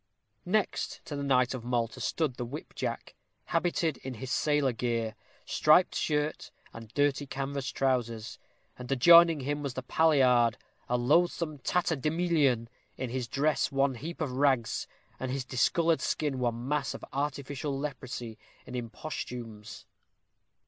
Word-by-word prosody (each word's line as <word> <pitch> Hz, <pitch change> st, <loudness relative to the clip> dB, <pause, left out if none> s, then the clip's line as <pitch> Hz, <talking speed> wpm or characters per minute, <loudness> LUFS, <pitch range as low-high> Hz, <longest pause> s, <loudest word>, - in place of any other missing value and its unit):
Next 210 Hz, +2 st, -1 dB
to 145 Hz, -, -5 dB
the 140 Hz, -, -3 dB
knight 130 Hz, -3 st, +2 dB
of 125 Hz, -3 st, -5 dB
Malta 120 Hz, -2 st, -1 dB
stood 155 Hz, -5 st, 0 dB
the 125 Hz, -, -5 dB
whip 140 Hz, +6 st, -7 dB
jack, -, -, -4 dB, 0.3 s
habited 165 Hz, -3 st, 0 dB
in 130 Hz, -1 st, -7 dB
his 130 Hz, +3 st, -6 dB
sailor 145 Hz, -3 st, +2 dB
gear 115 Hz, -1 st, -1 dB, 0.3 s
striped 155 Hz, +4 st, +4 dB
shirt 150 Hz, 0 st, -1 dB, 0.2 s
and 115 Hz, -1 st, -10 dB
dirty 145 Hz, 0 st, +1 dB
canvas 135 Hz, 0 st, -3 dB
trousers; 120 Hz, -5 st, -1 dB, 0.4 s
and 125 Hz, +1 st, -7 dB
adjoining 170 Hz, +3 st, +7 dB
him 145 Hz, +2 st, -2 dB
was 140 Hz, -3 st, -4 dB
the 130 Hz, -, -4 dB
palliard, 125 Hz, -6 st, +4 dB, 0.3 s
a 125 Hz, -, +2 dB
loathsome 155 Hz, +3 st, +2 dB
tatterdemalion, 155 Hz, -5 st, +1 dB, 0.3 s
his 125 Hz, -1 st, -3 dB
dress 145 Hz, +5 st, +1 dB
one 135 Hz, 0 st, +2 dB
heap 160 Hz, +8 st, -7 dB
of 145 Hz, -4 st, -1 dB
rags, 130 Hz, -3 st, +1 dB, 0.3 s
and 130 Hz, -, -3 dB
his 130 Hz, 0 st, -2 dB
discolored 165 Hz, +6 st, +2 dB
skin 145 Hz, -4 st, -1 dB
one 120 Hz, 0 st, -1 dB
mass 145 Hz, -2 st, -1 dB
of -, -, -8 dB
artificial 140 Hz, 0 st, -2 dB
leprosy 130 Hz, -5 st, -5 dB, 0.3 s
and 125 Hz, -, -8 dB
imposthumes. 115 Hz, -3 st, -6 dB
135 Hz, 135 wpm, -30 LUFS, 125-150 Hz, 0.4 s, adjoining